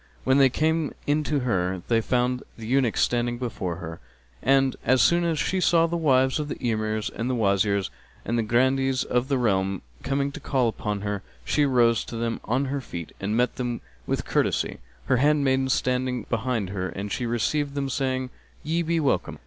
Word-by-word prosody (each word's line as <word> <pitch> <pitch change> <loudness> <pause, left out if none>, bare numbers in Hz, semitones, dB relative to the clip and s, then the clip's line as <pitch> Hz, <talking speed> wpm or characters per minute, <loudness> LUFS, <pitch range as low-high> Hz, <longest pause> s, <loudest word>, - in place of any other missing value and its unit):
When 130 +1 +3
they 135 -1 +6
came 160 +3 0
in 150 +1 +1
to 145 -2 0
her, 95 -6 -1
they 115 -1 +3
found 125 +2 0 0.2
the 115 - -8
eunuchs 125 -1 +2
standing 120 0 +1
before 105 -8 -3
her; 80 -1 -7 0.4
and, 135 0 +3
as 130 0 +3
soon 170 +5 +4
as 165 -2 0
she 185 +4 0
saw 170 -2 +4
the 170 +1 -2
wives 130 -4 +3
of 150 - -2
the - - -4
Emirs 110 -2 -1
and 115 +4 -3
Wazirs 100 -2 +1 0.3
and 115 -2 -1
Grandees 130 +2 +2
of 125 +1 0
the 135 -1 +1
realm 95 -5 0 0.2
coming 140 +1 -1
to - - -8
call 130 -4 +1
upon 105 -2 -3
her, 100 -1 -3 0.2
she 145 - +2
arose 120 -4 +3
to - - -7
them 115 0 -2
on 130 +5 +1
her 140 +1 -2
feet 85 -9 -7
and 105 +3 -1
met 125 0 +1
them 120 -2 -2 0.3
with - - -1
courtesy, - - 0 0.3
her 130 - +2
handmaidens 135 -1 +3
standing 125 -2 0
behind 115 -4 -1
her, 95 -2 -3
and 100 +1 -5
she 120 - -2
received 140 +5 0
them 140 -1 -1
saying, 130 -1 -1 0.3
"Ye 165 +3 0
be 170 0 0
welcome!" 140 -4 0
125 Hz, 190 wpm, -25 LUFS, 110-135 Hz, 0.4 s, they